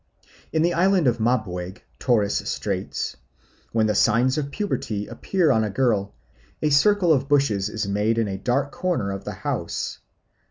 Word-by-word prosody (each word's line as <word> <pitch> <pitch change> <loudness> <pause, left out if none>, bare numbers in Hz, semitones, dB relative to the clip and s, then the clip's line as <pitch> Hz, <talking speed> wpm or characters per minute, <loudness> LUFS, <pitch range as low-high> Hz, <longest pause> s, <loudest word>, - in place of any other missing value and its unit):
In 160 0 +2
the 175 +1 +2
island 185 -1 +3
of 120 -2 +2
Mabuiag, 105 -6 -1 0.2
Torres 110 -6 +1
Straits, - - -3 0.5
when 110 -1 +2
the 105 - +2
signs 120 +5 +3
of 145 -2 -2
puberty 125 - -3
appear 180 -6 0
on 110 -3 +3
a 105 - -1
girl, 100 -3 0 0.4
a 150 - 0
circle 180 +3 +4
of 135 -1 0
bushes 110 -9 +2
is 110 -1 -3
made 105 +3 +1
in 115 -2 +1
a 95 - -3
dark 135 +6 0
corner 135 - -1
of 95 - -6
the - - -4
house. - - -3
120 Hz, 165 wpm, -23 LUFS, 105-150 Hz, 0.5 s, circle